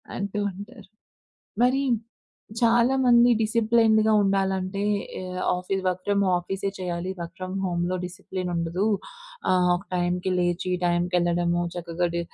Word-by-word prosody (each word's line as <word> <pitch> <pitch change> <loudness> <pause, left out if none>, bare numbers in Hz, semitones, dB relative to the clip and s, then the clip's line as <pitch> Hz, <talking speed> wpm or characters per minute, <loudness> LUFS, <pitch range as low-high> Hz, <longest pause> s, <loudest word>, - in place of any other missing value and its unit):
అంటూ 200 +1 -3
ఉంటారు. 205 +2 -11 0.8
మరి 260 +2 +3 0.8
చాలామంది 240 +1 +4
డిసిప్లిన్డ్‌గా 220 -1 +3
ఉండాలంటే 195 0 0 0.4
ఆహ్, 185 0 -6 0.2
ఆఫీసు 190 +1 -3
వర్క్ 185 0 -1
ఫ్రమ్ 200 0 +2 0.2
ఆఫీసే 195 +3 -3
చేయాలి. 180 0 -3
వర్క్ 170 0 -6
ఫ్రమ్ 185 0 -5
హోములో 175 0 -1
డిసిప్లిన్ 185 0 -5
ఉండదు. 170 +3 -1 0.7
ఆహ్, 180 -1 +3
ఒక 175 - -4
టైంకి 180 +1 0
లేచి 175 0 0
టైంకి 175 +1 +1
ఎళ్ళడము. 175 0 +1
చక్కగా 175 0 -2
డి 170 - 0
185 Hz, 120 wpm, -25 LUFS, 175-205 Hz, 0.8 s, చాలామంది